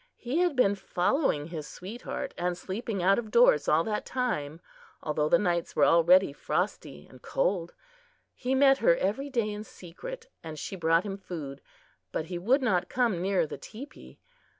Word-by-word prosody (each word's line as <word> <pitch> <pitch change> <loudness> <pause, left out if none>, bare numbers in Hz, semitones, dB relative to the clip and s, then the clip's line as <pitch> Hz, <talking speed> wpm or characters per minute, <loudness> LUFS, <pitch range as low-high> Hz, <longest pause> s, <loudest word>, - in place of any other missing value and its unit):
He 255 +7 -2
had 355 -4 +2
been 225 -6 +4
following 180 - 0
his 155 -3 -6
sweetheart 205 +10 -6
and 175 0 -2
sleeping 200 +1 -4
out 195 +3 +4
of 225 -2 -6
doors 210 -11 +5
all 155 +2 +4
that 210 +1 -2
time, 165 - -2 0.4
although 150 0 0
the - - +6
nights 175 -4 -1
were - - +5
already 170 0 +5
frosty 75 - -3
and 130 - -16
cold. 170 +3 -1 0.6
He 260 +1 -1
met 270 0 +5
her - - +4
every 275 - -1
day 230 -5 0
in 210 0 -5
secret 470 - -9 0.2
and 160 -1 -7
she 195 - -5
brought 165 -1 +2
him 195 -2 -5
food, 150 -8 -7 0.5
but 155 - -2
he 175 +1 -5
would 255 +9 +2
not 190 -8 +1
come 235 -8 +1
near 190 -2 +1
the - - -8
teepee. 275 +7 -11
190 Hz, 175 wpm, -28 LUFS, 165-245 Hz, 0.6 s, the